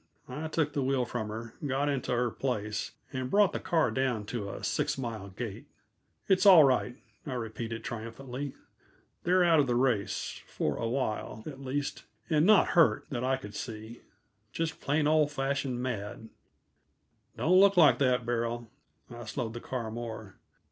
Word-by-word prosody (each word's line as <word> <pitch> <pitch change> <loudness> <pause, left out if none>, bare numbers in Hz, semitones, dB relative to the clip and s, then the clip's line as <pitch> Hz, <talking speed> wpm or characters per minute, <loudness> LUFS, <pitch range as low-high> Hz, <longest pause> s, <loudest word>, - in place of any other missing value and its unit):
I 155 +2 -5
took 155 -2 0
the 145 - 0
wheel 130 -1 +1
from 120 -2 -3
her, 115 +2 -6
got 140 0 0
into 135 -3 -1
her 120 -1 +1
place, 110 -5 -3 0.2
and 130 -1 -3
brought 205 +2 +4
the - - -2
car 160 -9 +1
down 125 -4 0
to 105 -5 -3
a - - -7
six - - 0
mile 115 -6 -4
gait. 100 +1 -6 0.6
"It's 190 -1 +4
all 180 -5 +10
right," 130 -2 +2 0.3
I 135 - -3
repeated 115 -1 -4
triumphantly. 125 +4 -6 0.7
"They're 180 +1 +4
out 165 -2 +5
of 140 - +3
the 120 - +1
race 120 -5 0
for - - -2
awhile, 115 -2 -2
at 135 -3 -8
least, 135 +1 -3 0.3
and 155 +2 +4
not 215 -2 +6
hurt, 170 -2 +4
that 125 -2 -2
I 130 +1 +1
could 105 -5 -10
see. 110 0 -7 0.5
Just 165 -1 -3
plain, 150 +2 +1
old 150 -1 +3
fashioned 135 -2 -1
mad. 110 -2 -4 1.1
Don't 180 +3 +4
look 200 -1 +6
like 165 -4 +7
that, 125 -3 +2
Beryl!" 120 -1 -2 0.4
I 120 0 -8
slowed 115 0 -4
the 120 - -7
car 120 -4 -4
more. 110 -3 -6
125 Hz, 165 wpm, -30 LUFS, 115-145 Hz, 1.1 s, all